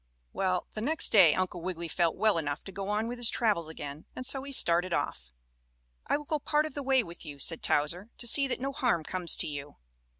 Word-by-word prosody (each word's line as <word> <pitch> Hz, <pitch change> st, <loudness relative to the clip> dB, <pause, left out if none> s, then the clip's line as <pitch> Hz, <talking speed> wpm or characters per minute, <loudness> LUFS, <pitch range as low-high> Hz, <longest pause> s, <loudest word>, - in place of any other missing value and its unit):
Well, 185 Hz, -2 st, -1 dB
the 215 Hz, -, -6 dB
next 315 Hz, +8 st, -1 dB
day 180 Hz, -8 st, +6 dB
Uncle 185 Hz, -2 st, -3 dB
Wiggily 170 Hz, -1 st, -5 dB
felt 170 Hz, 0 st, 0 dB
well 215 Hz, -5 st, +2 dB
enough 145 Hz, -2 st, -4 dB
to 195 Hz, -, -10 dB
go 195 Hz, +1 st, -6 dB
on 210 Hz, +2 st, -1 dB
with 240 Hz, +1 st, -6 dB
his 240 Hz, -2 st, +6 dB
travels 205 Hz, -9 st, 0 dB
again 145 Hz, -1 st, -9 dB
and 255 Hz, -, -6 dB
so 270 Hz, +1 st, +1 dB
he 280 Hz, +1 st, -8 dB
started 175 Hz, -7 st, +3 dB
off. 65 Hz, -, -3 dB, 0.8 s
"I -, -, +1 dB
will 295 Hz, -, -10 dB
go 305 Hz, +1 st, -2 dB
part 300 Hz, +2 st, 0 dB
of 310 Hz, -, -7 dB
the 285 Hz, -, -5 dB
way 265 Hz, -2 st, +2 dB
with 170 Hz, -3 st, -10 dB
you," 145 Hz, -1 st, -9 dB
said 165 Hz, +3 st, -1 dB
Towser, 170 Hz, +8 st, 0 dB
"to -, -, -6 dB
see 275 Hz, +4 st, +7 dB
that 260 Hz, -, -2 dB
no 270 Hz, +2 st, -3 dB
harm 235 Hz, -12 st, 0 dB
comes 180 Hz, 0 st, +3 dB
to -, -, +2 dB
you." 145 Hz, -1 st, -7 dB
185 Hz, 235 wpm, -29 LUFS, 165-250 Hz, 0.8 s, see